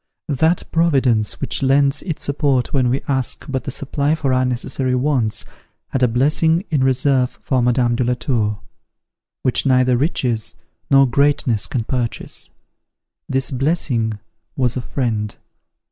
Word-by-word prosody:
That 160 +5 +2
Providence, 135 -10 +2
which - - -2
lends 140 +1 +3
its 165 -5 -5
support 140 -3 0
when 130 -3 +2
we 130 +3 -1
ask 130 -3 -1
but 130 -2 -3
the - - -3
supply 140 +2 -1
of 160 -2 -4
our 130 -1 +2
necessary 125 +1 -1
wants, 125 -5 0 0.4
had 135 - -2
a 125 - +5
blessing 150 - +2
in 145 -4 +2
reserve 130 -1 +1
for 130 -2 +1
Madame 120 0 +2
de 125 - 0
la 125 +1 +1
Tour, 110 -5 -1 0.8
which 130 - +2
neither 130 -2 +3
riches 120 -5 0 0.3
nor 135 0 +6
greatness 130 -4 +1
can 120 - -2
purchase: 120 0 -3 0.8
this 135 +1 -1
blessing 130 -6 0 0.4
was 125 -3 +1
a 130 - -2
friend. 110 -5 -2
130 Hz, 145 wpm, -19 LUFS, 120-140 Hz, 0.8 s, nor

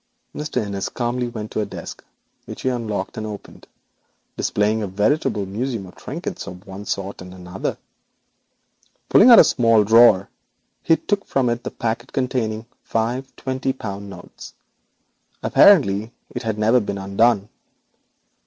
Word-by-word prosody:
Mr. 140 -7 -2
Innis 100 -1 -3
calmly 120 0 -2
walked 110 -3 -7
to - - -1
a - - -1
desk, - - -9 0.4
which - - -8
he 130 - +2
unlocked 110 -6 -3
and 110 - -4
opened, 105 -2 -10 0.7
displaying 105 +2 0
a 105 - -2
veritable 105 - 0
museum 110 +2 -3
of 90 - -14
trinkets - - -6
of 90 +3 -10
one 95 +2 -9
sort 100 -1 -4
and 90 0 -10
another. 90 +1 -5 1.3
Pulling 235 - +7
out 235 - +10
a - - +10
small 115 -3 +3
drawer 110 -3 +6 0.5
he 165 - +3
took 200 -1 -1
from 130 -3 +1
it 120 +1 -3
the - - -3
packet 115 +2 -4
containing 125 -5 -1
the 115 - -23 0.2
five 120 +4 -2
twenty 130 0 -2
pound 100 -5 -7
notes. 90 -2 -12 0.9
Apparently 115 - +5 0.2
it 120 - -4
had 110 -3 -2
never 110 +4 +4
been 100 -3 -4
opened. 100 +2 +2
110 Hz, 150 wpm, -21 LUFS, 100-125 Hz, 1.3 s, out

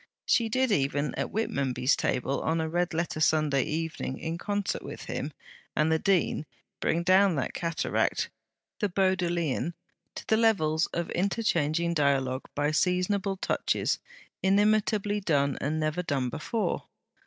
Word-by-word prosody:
She 230 -2 +3
did 255 +1 +1
even, 145 -2 +1
at - - -2
Whitmonby's 135 - 0
table, 135 +2 -1
on 165 +1 0
a 160 - 0
red 175 +3 0
letter 165 -1 -2
Sunday 155 -3 +3
evening, 155 -4 -3
in 165 +1 -4
concert 205 0 -2
with - - -8
him - - -4 0.4
and 155 +1 +2
the 160 - +3
Dean, 175 -5 +1 0.3
bring 170 +1 +1
down 185 0 +5
that 140 - -2
cataract, 165 -2 -1 0.5
the 205 - +1
Bodleian, 175 -4 0 0.4
to - - -7
the 220 - +3
levels 170 -8 +3
of 170 0 -3
interchanging 170 -4 +1
dialogue 135 -4 +1
by 145 +1 +1
seasonable 185 +4 +1
touches, - - 0 0.4
inimitably 205 +1 +2
done, 140 -6 +1
and 155 +3 -1
never 155 +3 0
done 140 -7 -1
before. 215 - -2
170 Hz, 140 wpm, -28 LUFS, 150-195 Hz, 0.5 s, down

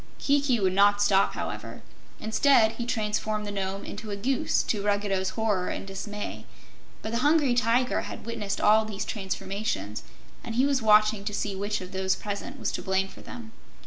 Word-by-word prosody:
Kiki 280 -4 +2
would 190 -2 +1
not 205 +1 +5
stop, 200 -1 +3
however. - - -6 0.4
Instead, 220 0 +4
he 235 +1 -5
transformed 215 -2 -1
the 205 - -4
Nome 195 0 -3
into 215 +1 -7
a 205 - -2
goose, 255 +6 0
to 210 - -1
Ruggedo's 200 -2 0
horror 210 -5 +1
and - - -4
dismay. 200 +2 -6 0.6
But 220 - -4
the 235 - 0
Hungry 290 -2 +3
Tiger 245 +1 +2
had - - -8
witnessed 210 -4 -3
all 215 +1 +5
these 215 -2 -4
transformations, 190 - -3 0.4
and 225 - -5
he 255 +3 +4
was 280 -2 +1
watching 215 -1 +4
to 210 -1 -2
see 205 -1 -2
which 205 +1 -2
of 185 0 -8
those 190 0 0
present 210 +6 -5
was - - -1
to - - -4
blame 190 0 0
for - - -13
them. 235 -3 -10
210 Hz, 180 wpm, -27 LUFS, 195-230 Hz, 0.6 s, not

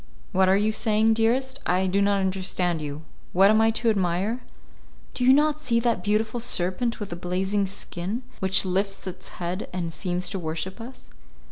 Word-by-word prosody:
"What 190 0 +3
are 190 - +5
you 210 +2 +2
saying, 220 +1 +3
dearest? 255 +4 +1
I 185 +1 +1
do 190 +2 +1
not 200 0 +2
understand 185 -3 -1
you. 150 +1 -6 0.3
What 195 +3 +6
am 220 0 +4
I 225 - +4
to 225 +1 +1
admire?" 195 +4 0 0.7
"Do 250 - -2
you 255 - +7
not 300 +2 +3
see 235 -6 +1
that 235 0 0
beautiful 220 +3 0
serpent 230 +1 -1
with 205 -4 -6
the - - -3
blazing 190 +3 -1
skin, 195 +4 -4 0.2
which 190 0 +2
lifts 195 +1 -1
its 185 -1 -7
head 180 +3 -4
and 170 -2 -3
seems 180 +1 -2
to 195 - -3
worship 170 +5 -4
us?" 250 +3 -11
195 Hz, 180 wpm, -25 LUFS, 180-225 Hz, 0.7 s, you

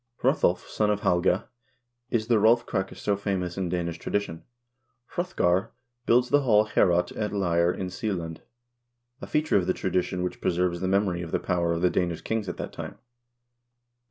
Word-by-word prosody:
Hrothulf, - - +2
son 105 -1 0
of 105 -1 0
Halga, 90 -1 +2 0.6
is 115 -3 0
the 115 -1 +3
Rolf 115 +3 +4
Krake 95 0 -2
so 100 - 0
famous 95 -3 -2
in 95 -2 -2
Danish 85 -1 -2
tradition. 95 -5 -2 0.7
Hrothgar 115 - 0 0.3
builds 125 +1 +4
the 145 - +4
hall 110 -5 +4
Ileorot 90 -4 +2
at 105 -1 -2
Leire 85 -3 +2
in 90 0 -4
Seeland, 90 -7 -4 0.8
a - - -6
feature 150 -4 +2
of 90 -2 0
the 95 - +2
tradition 90 0 -1
which 90 - -4
preserves 85 0 0
the 95 - 0
memory 95 -2 +1
of 85 - -6
the - - 0
power 85 -2 0
of 85 +1 -1
the 90 - +4
Danish 85 -2 -1
kings 110 -4 -2
at - - -5
that - - -6
time. - - -7
95 Hz, 175 wpm, -26 LUFS, 90-105 Hz, 0.8 s, Rolf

